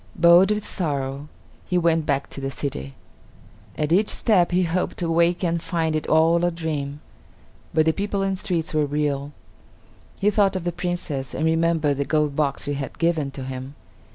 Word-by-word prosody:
Bowed 175 +3 +6
with 210 0 -1
sorrow, 140 -4 -3 0.4
he 180 - +1
went 165 -2 +2
back 140 -1 0
to 140 - -6
the 135 - -2
city. 70 - -5 0.8
At 150 0 -1
each 200 +5 +3
step 190 -7 +3
he 185 +1 +2
hoped 175 +2 -1
to 170 -2 -1
wake 170 +2 +2
and 170 -1 0
find 160 -2 -1
it 155 - -2
all 165 +2 +4
a 175 - +3
dream, 150 -4 -4 0.7
but 155 0 +3
the 160 - +3
people 200 +1 -2
and 195 0 0
streets 180 -5 -2
were 150 -1 +2
real. 145 -1 -1 0.9
He 205 +1 +3
thought 200 -2 +2
of 185 - -2
the 175 - -1
Princess, 170 -6 -4
and 160 - -1
remembered 160 -3 +2
the 140 - -1
gold 150 -2 +1
box 140 -2 0
she 145 - -2
had 140 -1 -5
given 165 -4 +1
to 135 -1 -7
him. 130 +1 -7
160 Hz, 185 wpm, -23 LUFS, 145-175 Hz, 0.9 s, Bowed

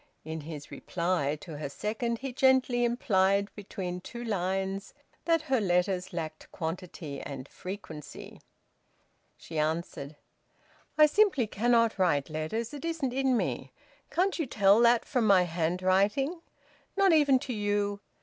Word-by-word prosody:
In 160 0 -5
his 150 -1 -8
reply 170 0 -1
to 160 -5 -8
her 145 -1 -4
second 225 - -2
he 265 +1 -6
gently 260 -1 +3
implied, 200 -4 +2
between 185 -3 -5
two 240 +6 -8
lines, 195 -2 -2 0.3
that 330 -2 +2
her 260 -4 +1
letters 180 0 +1
lacked 155 -3 -6
quantity 160 -4 -5
and 135 -1 -7
frequency. 165 -6 -9 1.0
She 160 -2 -5
answered: 155 -2 -2 0.8
"I 305 - +9
simply 330 - +3
cannot 230 0 +2
write 155 -6 +2
letters. 190 - -3
It 290 - -7
isn't 320 -6 -2
in 265 -1 +2
me. - - -3 0.4
Can't 370 +1 +1
you 315 - -1
tell 200 -2 +4
that 235 0 +4
from 245 -5 +1
my 190 -3 +6
handwriting? 185 - +1 0.6
Not 390 -3 +5
even 290 -4 +5
to 255 0 -4
you! 205 -1 0
200 Hz, 135 wpm, -29 LUFS, 170-245 Hz, 1.0 s, I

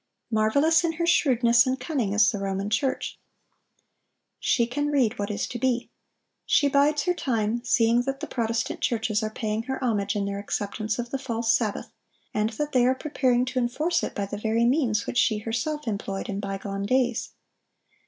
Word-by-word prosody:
Marvelous 280 +10 +3
in 335 -1 0
her 340 +1 -1
shrewdness 245 -6 +4
and 260 +1 0
cunning 250 -6 -1
is 215 +1 +4
the 205 - -4
Roman 195 +1 -2
Church. 265 +4 -1 1.2
She 235 - +2
can 290 +5 -2
read 250 -6 +1
what 205 +1 -2
is 210 - -2
to 240 - -5
be. 250 -1 0 0.5
She 285 - +3
bides 285 +1 +3
her 360 - +1
time, 235 -6 -1
seeing 235 -1 +3
that 270 +2 -3
the - - -4
Protestant 230 -1 -2
churches 225 -2 0
are 215 - -1
paying 215 0 -2
her 265 0 -3
homage 205 -4 0
in 200 -1 0
their 200 0 -3
acceptance 210 +1 -3
of 240 -1 -4
the 270 - -2
false 230 -3 0
sabbath, 215 -4 -1 0.4
and 210 +1 +1
that 295 +6 -3
they 250 -1 +4
are 260 - +3
preparing 255 -4 +1
to 255 0 -2
enforce 300 +8 0
it - - -4
by 200 - -1
the 205 +1 -6
very 225 +2 +1
means 240 -6 +1
which 245 - 0
she 220 - +3
herself 250 +7 -3
employed 200 -2 -3
in 200 0 -3
bygone 195 0 -4
days. 250 0 0
235 Hz, 185 wpm, -26 LUFS, 215-265 Hz, 1.2 s, shrewdness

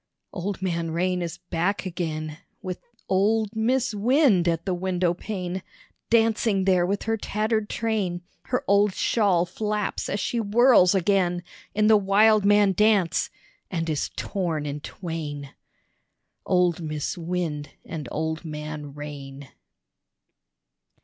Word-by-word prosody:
Old 190 +1 -4
Man 170 -3 -1
Rain 180 +2 0
is 170 -2 -4
back 190 +5 -2
again, 155 -3 -4 0.2
With 185 -2 -4 0.3
old 210 +3 +1
Mis' 245 +2 +1
Wind 220 - +3
at 165 -1 0
the 185 - 0
windowpane, 180 +1 -2 0.5
Dancing 225 -3 +2
there 180 -2 +3
with 200 +2 -1
her 225 0 0
tattered 215 0 -1
train: 200 -6 -1 0.2
Her 250 - -1
old 200 -1 +3
shawl 195 -6 +2
flaps 210 +2 -2
as 200 - -1
she 240 - -1
whirls 220 -3 +5
again 180 -2 +1 0.3
In 210 0 +3
the 215 0 +7
wildman 205 0 +4
dance 205 -3 +2 0.4
and 165 -2 -2
is 150 - -1
torn 170 -6 -2
in 145 0 -4
twain. 150 -4 -6 0.9
Old 180 -2 +2
Mis' 155 +4 -3
Wind 165 -4 -3 0.2
and 150 -6 -6
Old 160 +1 -2
Man 150 -2 -6
Rain. 140 -2 -8
185 Hz, 125 wpm, -25 LUFS, 165-210 Hz, 0.9 s, the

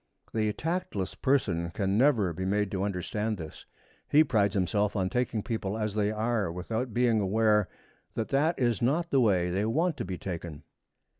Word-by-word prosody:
The 110 -1 +1
tactless 160 - -3
person 90 -11 0
can 95 +3 -1
never 115 -7 +3
be 90 +3 -4
made 100 +1 0
to 95 - -2
understand 105 +3 -2
this. 80 -3 -9 0.4
He 155 +2 +6
prides 105 -8 +1
himself 100 +3 +1
on 95 -2 0
taking 125 -4 -1
people 110 -3 -3
as 105 -2 -2
they 105 -1 +1
are 110 -3 0
without 110 +8 -3
being 120 -1 +2
aware 105 0 +2 0.5
that 110 - -2
that 150 +5 +2
is 120 -5 +1
not 160 +8 +1
the 135 - +4
way 90 -6 +2
they 95 +3 0
want 160 +8 +1
to 120 - -3
be 90 0 -4
taken. 85 -5 -6
105 Hz, 175 wpm, -29 LUFS, 95-120 Hz, 0.5 s, He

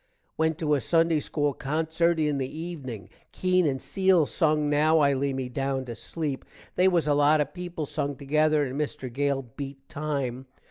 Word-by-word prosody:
Went 160 -1 +1
to 150 -2 0
a 140 - +2
sunday 165 +5 +2
school 145 -1 -1
concert 160 +4 0
in 150 -2 +1
the 135 +4 -4
evening. 135 - -6 0.2
Keene 185 -2 +2
and 135 -2 -1
Cele 180 +4 +3
sung 155 0 +1
now 150 +2 +3
i 140 -2 +4
lay 140 +1 0
me 130 -1 -3
down 135 +1 -2
to 120 - -6
sleep. 145 +3 -4 0.3
they 185 - +4
was 170 -4 +2
a 145 - +4
lot 145 +2 +4
of 150 0 -1
people 175 -3 -5
sung 145 -1 -2
together 150 +2 +2
and 130 0 -5
Mister 145 -3 -3
Gale 140 +2 0
beat 135 +2 -9
time. 140 -5 -3
150 Hz, 185 wpm, -27 LUFS, 135-160 Hz, 0.3 s, i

